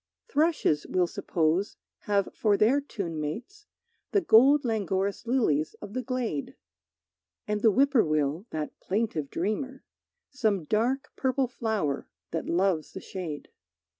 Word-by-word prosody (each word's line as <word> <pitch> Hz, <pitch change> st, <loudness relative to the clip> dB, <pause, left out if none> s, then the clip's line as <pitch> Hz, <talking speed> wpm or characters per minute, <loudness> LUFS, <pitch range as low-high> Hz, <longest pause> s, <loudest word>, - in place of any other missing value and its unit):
Thrushes, 310 Hz, -, +1 dB
we'll 180 Hz, -1 st, +2 dB
suppose, 170 Hz, +2 st, 0 dB, 0.2 s
have 200 Hz, -2 st, +1 dB
for 210 Hz, -2 st, +2 dB
their 245 Hz, +8 st, +4 dB
tune 190 Hz, -, -5 dB
mates 245 Hz, -, -6 dB, 0.5 s
The 405 Hz, -, +4 dB
gold 275 Hz, 0 st, +6 dB
languorous 200 Hz, -1 st, -1 dB
lilies 160 Hz, -, +1 dB
of 205 Hz, -1 st, -10 dB
the 255 Hz, -, -1 dB
glade; 250 Hz, -, -3 dB, 0.9 s
And 210 Hz, 0 st, -1 dB
the 225 Hz, -, +6 dB
whippoorwill, 190 Hz, -, +2 dB
that 155 Hz, -1 st, -5 dB
plaintive 190 Hz, -9 st, -1 dB
dreamer, 260 Hz, -, -3 dB, 0.5 s
Some 215 Hz, -, +1 dB
dark 245 Hz, -, 0 dB
purple 260 Hz, 0 st, +1 dB
flower 220 Hz, -, -2 dB, 0.2 s
that 165 Hz, -, -3 dB
loves 175 Hz, -2 st, +1 dB
the -, -, -6 dB
shade. 175 Hz, -7 st, -6 dB
210 Hz, 125 wpm, -28 LUFS, 170-255 Hz, 0.9 s, gold